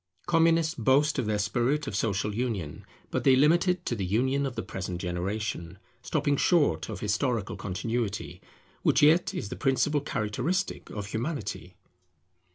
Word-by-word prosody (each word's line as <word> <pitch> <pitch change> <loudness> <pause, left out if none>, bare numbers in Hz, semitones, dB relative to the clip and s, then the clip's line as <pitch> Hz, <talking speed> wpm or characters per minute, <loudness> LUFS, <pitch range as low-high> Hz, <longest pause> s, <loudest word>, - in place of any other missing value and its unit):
Communists 165 -1 +3
boast 140 +5 +2
of 120 - -1
their 105 -1 +1
spirit 120 +8 0
of 120 - -4
social 105 -1 0
union; 105 -10 -3 0.2
but - - -1
they 130 - +6
limit 155 +7 +4
it 180 -1 0
to 120 - -1
the 100 - -3
union 130 +9 +1
of 125 - -7
the 115 - -3
present 90 -2 -5
generation, 90 0 -3 0.2
stopping 145 - 0
short 145 - +2
of - - -6
historical 105 +1 -1
continuity, 105 +2 -3 0.4
which - - +3
yet 160 +4 +5
is 100 - -4
the - - -5
principal 145 +2 +1
characteristic 145 - -2
of 105 -2 -5
Humanity. 110 - -4
120 Hz, 155 wpm, -28 LUFS, 100-145 Hz, 0.4 s, they